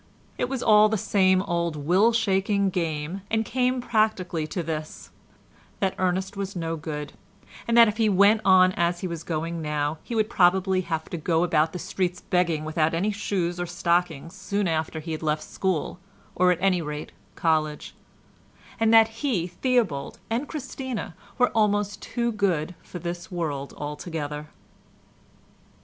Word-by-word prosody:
It 245 - 0
was 265 -2 -3
all 215 -1 +6
the 220 - 0
same 190 -2 +3
old 170 -3 -1
will 180 +10 +3
shaking 200 -3 +1
game 165 +1 -3
and 220 0 +1
came 255 +1 0
practically 215 -9 0
to 175 +3 -3
this, 155 -1 -6 0.7
that 190 -1 +1
Ernest 185 +1 0
was 195 0 -4
no 165 -1 -2
good, 150 -2 -6 0.5
and 235 0 +2
that 235 -1 +9
if 210 0 -2
he 225 -2 +3
went 200 +3 +5
on 185 -1 +6
as 175 -1 0
he 185 - -2
was 170 -2 -5
going 165 0 -3
on - - -5
now, 150 0 -1
he 235 - -6
would 215 -1 +2
probably 190 -1 +3
have 160 -3 -3
to 175 - -3
go 165 +1 +1
about 160 -2 +2
the 180 - -5
streets 180 0 -2
begging 170 -5 0
without 155 +1 +1
any 195 +6 +1
shoes 185 -4 -2
or 175 - -2
stockings 170 -2 0
soon 200 0 -2
after 160 -1 -1
he 165 +1 -6
had 155 - -4
left 155 -1 -1
school, 185 -2 -2 0.3
or 180 0 +4
at 180 - +1
any 185 -2 +2
rate, 150 -1 -6 0.2
college; 155 -2 0 0.9
and 225 0 +3
that 225 -1 +7
he, 230 - 0
Theobald, 185 - -1
and 245 +6 -1
Christina 260 - -5 0.2
were 250 -1 +4
almost 205 -2 +1
too 235 -1 -2
good 180 -6 0
for - - -9
this 175 0 -5
world 150 -6 -3
altogether. 150 0 -5
180 Hz, 165 wpm, -25 LUFS, 160-205 Hz, 0.9 s, that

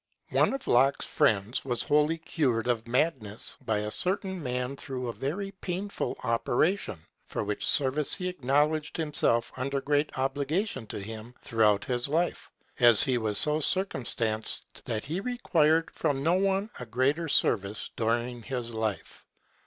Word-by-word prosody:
One - - +3
of 275 - -8
Locke's 135 +3 +3
friends 105 +3 +1
was 120 -3 -1
wholly 150 +2 +2
cured 135 -8 0
of 120 -2 -1
madness 120 -5 -1
by 110 -1 0
a 105 0 -3
certain 190 - -1
man 125 0 -2
through 130 -2 -5
a 120 - -3
very 195 - -3
painful 195 +1 -4
operation, 120 - +1 0.3
for - - -3
which 105 0 -3
service 145 +1 +3
he 180 -2 -3
acknowledged 150 -1 0
himself 150 -7 +2
under 140 +2 -1
great 145 +1 0
obligation 140 - -1
to - - -6
him 110 +4 -8
through 115 -1 +2
out 105 -1 +3
his 125 0 -1
life, 165 +4 -1 0.3
as 120 -4 +7
he 130 -3 +1
was 105 -2 -1
so 150 0 +4
circumstanced 120 - -1
that 110 -1 -3
he 160 +6 -2
required 165 -9 +1
from 135 -1 -1
no 165 +3 +3
one 195 +2 +1
a 125 - -7
greater 135 +8 +1
service 100 -5 +1
during 120 +2 -1
his 120 -1 -4
life. 110 -2 -4
135 Hz, 155 wpm, -28 LUFS, 115-160 Hz, 0.3 s, as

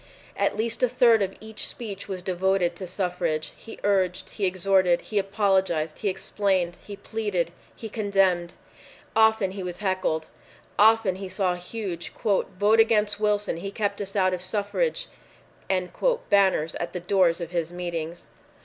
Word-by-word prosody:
At - - 0
least 230 +1 -1
a 250 - +4
third 235 -2 +5
of 195 -1 -1
each 220 0 -3
speech 205 -5 -7
was 185 -2 -5
devoted 185 -1 +1
to 185 +1 -6
suffrage. 175 -4 -2
He 225 - -11
urged. 190 -3 +1
He 200 -3 0
exhorted. 185 -1 +3
He 210 - -1
apologized. 190 -6 +1
He 205 - 0
explained. 190 -2 0
He 205 - -8
pleaded. 200 -5 -2 0.2
He 225 - -7
condemned. 195 -5 +1 0.6
Often 220 -3 +4
he 195 0 -6
was 180 -1 -5
heckled. 185 -5 -1 0.5
Often 215 -3 +5
he 190 -1 -6
saw 185 -1 0
huge 180 -1 -5
"VOTE 205 0 +1
AGAINST 215 -2 +3
WILSON! 210 -4 +1
HE 195 +4 -5
KEPT 205 0 -2
US 195 0 -6
OUT 185 -2 +3
OF 180 - -3
SUFFRAGE!" 215 - -1 1.2
banners 190 -6 +3
at 170 - -4
the 180 - -3
doors 180 -1 +2
of 170 -1 -5
his 170 -2 -2
meetings. 170 -1 -5
195 Hz, 150 wpm, -26 LUFS, 180-210 Hz, 1.2 s, third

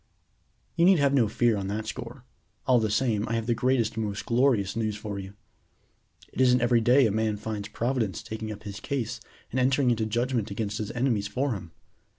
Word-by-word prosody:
"You 170 - +5
need 190 0 +6
have 140 -2 +3
no 125 -5 +4
fear 115 +2 +2
on 100 -2 -3
that 105 +2 -3
score. 120 +2 -7 0.4
All 125 -2 +4
the 110 -1 0
same, 110 -1 +1
I - - -1
have 115 -1 -1
the 120 - +2
greatest 125 -2 +1
and 110 - -1
most 100 -1 -4
glorious 115 -5 +2
news 110 -2 -1
for 105 -1 -5
you. 95 +1 -9 1.0
It - - -1
isn't 125 -1 +5
every 120 -1 +3
day 125 +4 +5
a 110 - +2
man 110 0 0
finds 105 -1 -5
Providence 115 -7 -2
taking 110 0 -5
up 105 0 -9
his 100 -1 -7
case 125 -5 -3 0.3
and 130 - -1
entering 130 0 +3
into 110 -2 0
judgment 120 0 -1
against 105 0 -3
his 105 - -3
enemies 120 -5 0
for 130 +3 -1
him. 90 -5 -7
115 Hz, 205 wpm, -27 LUFS, 105-125 Hz, 1.0 s, need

